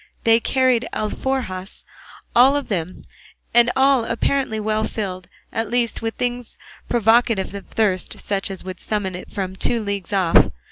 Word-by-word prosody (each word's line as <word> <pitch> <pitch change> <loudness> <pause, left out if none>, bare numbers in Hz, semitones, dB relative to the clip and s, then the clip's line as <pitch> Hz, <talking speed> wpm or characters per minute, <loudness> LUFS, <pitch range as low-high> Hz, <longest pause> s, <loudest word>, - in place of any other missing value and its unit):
They 225 0 +5
carried 255 0 +2
alforjas 215 -4 -3 0.5
all 260 +4 +6
of 285 - -2
them, 180 -3 -3 0.5
and 240 0 +6
all 265 -2 +4
apparently 230 0 0
well 215 0 0
filled, 185 -5 -4 0.3
at 225 -1 -2
least 240 0 0
with 225 0 -3
things 245 -1 -3 0.3
provocative 225 -3 +2
of 200 - -8
thirst, 200 -4 -1
such 200 -1 -2
as 190 -1 -6
would 185 -1 -7
summon 205 -3 -2
it 180 - -8
from 190 -1 -4
two 235 +4 0
leagues 200 -4 -4
off. 185 -4 +4
220 Hz, 150 wpm, -21 LUFS, 195-240 Hz, 0.5 s, all